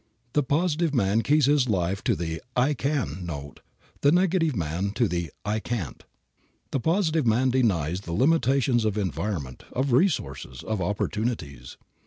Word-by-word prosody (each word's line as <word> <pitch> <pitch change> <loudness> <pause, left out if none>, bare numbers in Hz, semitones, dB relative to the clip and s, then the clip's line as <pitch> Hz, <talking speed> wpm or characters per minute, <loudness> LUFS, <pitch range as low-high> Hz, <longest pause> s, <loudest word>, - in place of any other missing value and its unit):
The 150 - +3
positive 155 +2 +1
man 110 -1 +2
keys 150 +3 +3
his 140 -3 +3
life 95 -1 0
to - - +3
the 80 0 -4
"I 130 +4 +3
can" 130 - -2
note, 70 -5 -7 0.4
the 140 - +5
negative 175 -4 +2
man 90 +3 -2
to 120 0 +2
the 85 -3 -2 0.2
"I 105 +1 0
can't." 110 - -4 0.7
The 135 - 0
positive 160 - +1
man 125 +4 +3
denies 95 - +1
the 85 -4 -6
limitations 135 - +3
of 110 -1 0
environment, 80 -7 -3
of 135 +2 -1
resources, 70 - 0
of 110 -3 -2
opportunities. 90 - -3
110 Hz, 150 wpm, -26 LUFS, 85-140 Hz, 0.7 s, the